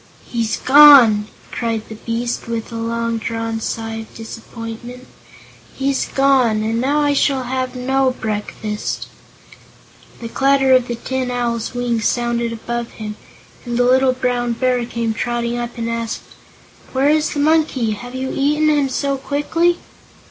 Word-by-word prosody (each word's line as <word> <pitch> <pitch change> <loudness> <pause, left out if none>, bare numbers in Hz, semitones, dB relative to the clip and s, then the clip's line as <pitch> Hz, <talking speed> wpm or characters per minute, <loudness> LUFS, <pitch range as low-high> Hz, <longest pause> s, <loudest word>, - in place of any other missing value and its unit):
"He's 230 -2 -2
gone!" 260 -7 +8 0.2
cried 225 -2 -2
the - - -8
beast, 230 +2 -3
with 230 0 -4
a - - -6
long 230 0 -2
drawn 225 0 -3
sigh 225 0 -4
of 225 0 -9
disappointment; 230 +2 -8 0.7
"he's 275 0 0
gone, 260 -6 +2
and 225 +2 0
now 285 +3 +1
I 290 -1 +2
shall 275 -2 +1
have 255 +1 -3
no 265 +1 +1
breakfast." 210 -2 -4 1.1
The 235 - -6
clatter 270 +2 +3
of 255 -1 +4
the 240 - -3
Tin 260 +2 -3
Owl's 240 -1 -2
wings 240 -2 0
sounded 235 -1 0
above 235 +1 -4
him, 210 -1 -6 0.5
and 240 -1 -3
the 245 - +3
little 260 +1 +4
Brown 245 -1 -1
Bear 250 0 +1
came 230 -2 -2
trotting 240 +1 -2
up 240 0 -5
and 230 0 -3
asked: 230 -1 -3 0.7
"Where 270 +2 +3
is 310 0 +2
the - - -1
monkey? 295 -6 +2
Have 245 +4 -7
you 260 0 -3
eaten 300 +2 +2
him 290 -3 +2
so 275 +1 -1
quickly?" 325 +6 0
240 Hz, 150 wpm, -19 LUFS, 230-265 Hz, 1.1 s, gone